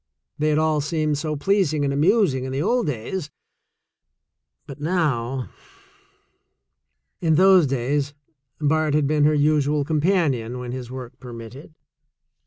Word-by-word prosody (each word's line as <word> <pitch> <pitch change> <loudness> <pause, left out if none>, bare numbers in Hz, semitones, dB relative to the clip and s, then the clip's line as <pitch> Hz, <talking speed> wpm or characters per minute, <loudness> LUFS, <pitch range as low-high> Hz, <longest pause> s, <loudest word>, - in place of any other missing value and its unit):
They 155 +1 +1
had 150 - +2
all 155 -1 +2
seemed 150 -1 -1
so 155 0 -2
pleasing 155 -3 +1
and 140 - 0
amusing 155 - +2
in 130 - -5
the 135 - -2
old 235 +3 +1
days 145 +6 -4 0.8
— - - -56
but 145 -2 -10
now 135 -7 -1 0.8
— 395 - -52
jn 160 -3 +2
those 185 -2 +6
days 135 +3 -1 0.4
Bart 155 0 +1
had 150 -1 +2
been 150 +1 +2
her 150 0 +3
usual 150 -1 +2
companion 150 - 0
when 125 -1 -6
his 125 -1 -6
work 125 -2 -9
permitted. 125 +5 -10
150 Hz, 140 wpm, -23 LUFS, 135-160 Hz, 0.8 s, those